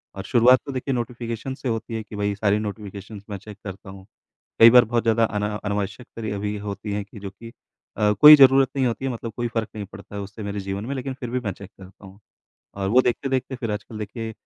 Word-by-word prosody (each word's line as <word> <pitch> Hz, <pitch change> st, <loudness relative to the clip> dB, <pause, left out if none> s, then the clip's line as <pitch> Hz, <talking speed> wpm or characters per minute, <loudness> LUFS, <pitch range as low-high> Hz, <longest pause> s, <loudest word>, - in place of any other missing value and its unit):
और 95 Hz, -, -6 dB
शुरुआत 125 Hz, +1 st, +5 dB
तो 140 Hz, -, -5 dB
देखिए 130 Hz, +1 st, -2 dB
नोटिफ़िकेशन 120 Hz, +1 st, -4 dB
से 130 Hz, -1 st, -4 dB
होती 115 Hz, 0 st, -3 dB
है 110 Hz, -, -3 dB
कि 105 Hz, -, -11 dB
भाई 100 Hz, 0 st, -1 dB
सारी 105 Hz, 0 st, +1 dB
नोटिफ़िकेशन 105 Hz, -1 st, -7 dB
मैं 100 Hz, -, -4 dB
चेक 105 Hz, +1 st, -12 dB
करता 95 Hz, -1 st, -8 dB
हूँ। 95 Hz, 0 st, -12 dB, 0.5 s
कई 115 Hz, -, +10 dB
बार 125 Hz, 0 st, +7 dB
बहुत 120 Hz, +1 st, 0 dB
ज़्यादा 115 Hz, 0 st, +3 dB
अना 105 Hz, -1 st, -2 dB
अनावश्यक 100 Hz, +3 st, -3 dB
क्रिया 110 Hz, -3 st, -3 dB
भी 105 Hz, +1 st, -3 dB
होती 100 Hz, 0 st, -6 dB
है 105 Hz, 0 st, -2 dB
कि 105 Hz, +2 st, -13 dB
जो 100 Hz, 0 st, -6 dB
कि 115 Hz, +4 st, -12 dB, 0.5 s
अ, 105 Hz, -1 st, +3 dB
कोई 150 Hz, 0 st, +12 dB
ज़रूरत 135 Hz, -1 st, +6 dB
नहीं 135 Hz, -1 st, +1 dB
होती 120 Hz, +3 st, -3 dB
है, 135 Hz, -, -1 dB
मतलब 115 Hz, -1 st, -6 dB
कोई 120 Hz, 0 st, -1 dB
फ़र्क 110 Hz, -2 st, -1 dB
नहीं 105 Hz, -1 st, -5 dB
पड़ता 100 Hz, +1 st, -12 dB
है 100 Hz, -, -3 dB
उससे 100 Hz, +2 st, -8 dB
मेरे 100 Hz, 0 st, -4 dB
जीवन 100 Hz, +2 st, -4 dB
में 135 Hz, -, -3 dB
लेकिन 135 Hz, 0 st, -4 dB
फिर 120 Hz, -, -5 dB
भी 125 Hz, +1 st, -1 dB
मैं 110 Hz, -5 st, -3 dB
चेक 100 Hz, +1 st, -12 dB
करता 95 Hz, +1 st, -14 dB
हूँ। 95 Hz, +1 st, -14 dB, 0.6 s
और 95 Hz, -1 st, -2 dB
वो 125 Hz, +4 st, +6 dB
देखते-देखते 130 Hz, +1 st, -1 dB
फिर 120 Hz, -3 st, -4 dB
आजकल 105 Hz, +1 st, -6 dB
देखिए 110 Hz, +1 st, -5 dB
110 Hz, 240 wpm, -23 LUFS, 100-120 Hz, 0.6 s, कोई